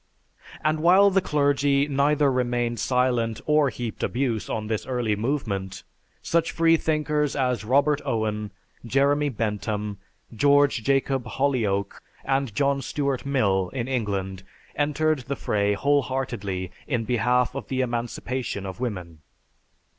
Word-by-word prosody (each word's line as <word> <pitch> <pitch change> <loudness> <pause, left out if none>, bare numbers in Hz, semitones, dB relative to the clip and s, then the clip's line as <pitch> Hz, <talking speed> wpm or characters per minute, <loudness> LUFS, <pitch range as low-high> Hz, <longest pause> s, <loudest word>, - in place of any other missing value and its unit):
And 155 +1 +1
while 190 +5 +6
the 195 0 +3
clergy 145 -2 +2
either 145 0 +2
remained 120 -2 -1
silent 125 -3 +1
or 150 -2 +3
heaped 120 -3 -6
abuse 120 -4 -1
on 110 -1 -2
this 110 -1 -3
early 120 -5 0
movement, 105 -6 -3 0.4
such 170 0 +1
freethinkers 155 -3 +1
as 125 -5 0
Robert 140 +5 +2
Owen, 105 -2 -2 0.3
Jeremy 140 +4 +2
Bentham, 105 -3 -3 0.4
George 140 0 +4
Jacob 135 0 +1
Holyoake, 110 -7 -1 0.3
and 135 -5 0
John 140 -1 +1
Stuart 140 -2 -2
Mill 100 -9 +1
in 125 -2 -3
England 100 -7 -2 0.3
entered 150 +1 +1
the 130 +2 -4
fray 105 -4 0
wholeheartedly 120 -7 -1 0.2
in 120 -5 0
behalf 125 +2 +1
of 135 - -6
the 130 -1 -1
emancipation 120 -2 -3
of 95 +3 -7
woman. 90 -10 -5
130 Hz, 125 wpm, -25 LUFS, 110-140 Hz, 0.4 s, while